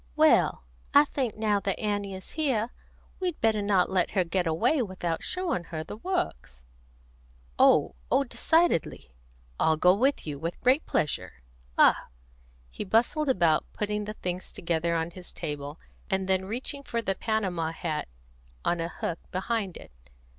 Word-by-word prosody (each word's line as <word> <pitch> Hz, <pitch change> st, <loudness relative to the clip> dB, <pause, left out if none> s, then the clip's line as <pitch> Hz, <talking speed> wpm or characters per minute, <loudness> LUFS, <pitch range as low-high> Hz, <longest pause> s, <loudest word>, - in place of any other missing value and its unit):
"Well, -, -, +4 dB, 0.3 s
I 290 Hz, +1 st, +8 dB
think 255 Hz, -7 st, -2 dB
now 210 Hz, -2 st, +2 dB
that 195 Hz, 0 st, -2 dB
Annie 205 Hz, -2 st, -2 dB
is 190 Hz, -, -9 dB
here, 250 Hz, -7 st, 0 dB, 0.5 s
we'd 360 Hz, -4 st, -2 dB
better 220 Hz, -2 st, +2 dB
not 200 Hz, -3 st, +3 dB
let 185 Hz, -2 st, +2 dB
her 185 Hz, -, +5 dB
get 175 Hz, +1 st, -1 dB
away 235 Hz, -, +2 dB
without 180 Hz, -6 st, -3 dB
showing 350 Hz, -, -2 dB
her 160 Hz, -1 st, -5 dB
the 160 Hz, -, -8 dB
Works." 230 Hz, -, -3 dB, 1.0 s
"Oh -, -, +5 dB, 0.2 s
oh 275 Hz, -, +4 dB
decidedly! 275 Hz, -, +1 dB, 0.5 s
I'll 160 Hz, -1 st, +3 dB
go 180 Hz, +3 st, +6 dB
with 265 Hz, +8 st, +1 dB
you, 145 Hz, -3 st, -5 dB
with 165 Hz, +3 st, -4 dB
great 260 Hz, +5 st, +3 dB
pleasure. 145 Hz, -, -2 dB, 0.3 s
Ah!" -, -, +5 dB, 0.6 s
He -, -, -4 dB
bustled 240 Hz, +9 st, +2 dB
about, 170 Hz, -10 st, +2 dB
putting 210 Hz, 0 st, -2 dB
the 210 Hz, -, -5 dB
things 180 Hz, -1 st, -4 dB
together 170 Hz, 0 st, -1 dB
on 165 Hz, +1 st, -1 dB
his 180 Hz, 0 st, -8 dB
table, 145 Hz, 0 st, -5 dB, 0.3 s
and 190 Hz, -1 st, 0 dB
then 190 Hz, 0 st, +1 dB
reaching 255 Hz, +7 st, -3 dB
for 235 Hz, -4 st, -3 dB
the 195 Hz, -, +1 dB
Panama 190 Hz, -6 st, -1 dB
hat 165 Hz, -2 st, -3 dB, 0.6 s
on 175 Hz, -, +1 dB
a 165 Hz, 0 st, -2 dB
hook 170 Hz, -1 st, -4 dB
behind 195 Hz, 0 st, -2 dB
it. -, -, -13 dB
190 Hz, 155 wpm, -28 LUFS, 170-235 Hz, 1.0 s, I